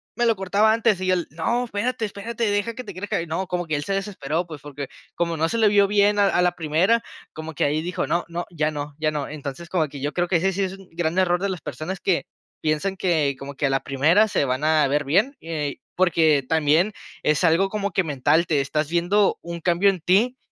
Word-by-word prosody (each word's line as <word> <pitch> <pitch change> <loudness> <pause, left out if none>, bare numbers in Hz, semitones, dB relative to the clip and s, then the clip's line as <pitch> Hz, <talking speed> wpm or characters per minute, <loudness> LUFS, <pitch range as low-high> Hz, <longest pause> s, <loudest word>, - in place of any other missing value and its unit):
me 240 - +1
lo 230 -1 +3
cortaba 200 +3 +3
antes". 225 -4 +2
Y 185 0 +1
él: 180 -2 0
"No, 235 +10 -1
espérate, 230 +1 -2
espérate, 225 +2 -3
deja 205 +3 0
que 255 - -6
te 200 - -7
crezca". 190 -1 -2
Y 170 - -6
no, 165 +4 -2
como 180 -1 -2
que 155 - 0
él 145 - -2
se 195 - -5
desesperó, 180 -5 -2
pues, 155 -4 -9
porque 145 -1 -7 0.3
como 170 -1 -1
no 160 +1 +1
se 230 - -1
le 220 -1 +4
vio 205 -1 +5
bien 205 0 +3
a 200 -1 +4
a 180 - +2
la 180 0 +2
primera, 175 +8 +1 0.3
como 160 0 -7
que - - +1
ahí 150 +2 +1
dijo: 175 +1 -3
"No, 175 - +1
no, 170 +1 -4
ya 155 -2 0
no, 145 -1 -6
ya 155 0 +1
no". 150 -2 -3
Entonces, 145 +2 -7
como 165 -5 0
que 140 - -9
yo 145 +2 -2
creo 175 0 0
que 180 - +3
ese 190 +3 +1
sí 195 +2 0
es 190 -1 -2
un 195 -1 -15
gran 165 +1 -2
error 175 -1 +2
de 200 - 0
las 185 -2 -3
personas 180 +7 -5
que 180 -2 +1 0.4
piensan 155 +5 0
que 160 -7 +1
como 140 +1 -8
que 145 - -1
a - - 0
la 135 0 +1
primera 155 +10 +3
se 145 - +1
van 130 +2 -2
a 155 -2 +4
ver 145 +2 +1
bien, 200 - +2
eh, 155 -4 -3 0.2
porque 160 -5 +3
también 160 +6 +2 0.3
es 150 +3 +2
algo 175 +3 +3
como 205 -1 -2
que 190 - +1
mental, 155 +3 +2
te 150 -4 +2
estás 150 +2 -1
viendo 175 +4 +2
un 170 0 -6
cambio 175 +4 +3
en 190 -2 -1
ti 215 +10 +2
175 Hz, 250 wpm, -23 LUFS, 155-195 Hz, 0.4 s, vio